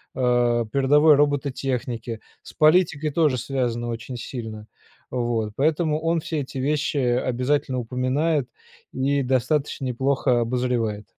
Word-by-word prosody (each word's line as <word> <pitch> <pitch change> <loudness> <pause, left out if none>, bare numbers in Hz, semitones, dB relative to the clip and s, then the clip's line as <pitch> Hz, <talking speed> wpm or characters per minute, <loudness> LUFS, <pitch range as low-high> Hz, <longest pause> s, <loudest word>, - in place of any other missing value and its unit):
э, 120 -2 +2
передовой 145 +3 +5
робототехники, 130 -5 -1 0.2
с - - -13
политикой 155 -1 +3
тоже 150 -4 +2
связано 120 -2 -2
очень 115 +2 -5
сильно. 110 -3 -7 0.5
Вот, 120 -4 -1
поэтому 155 +1 +1
он 165 +1 0
все 155 -1 -3
эти 135 0 -6
вещи 145 +2 0
обязательно 130 +1 0
упоминает 130 +4 0 0.5
и 140 +1 0
достаточно 135 +2 0
неплохо 130 0 +1
обозревает. 120 -3 -1
130 Hz, 115 wpm, -23 LUFS, 120-145 Hz, 0.5 s, передовой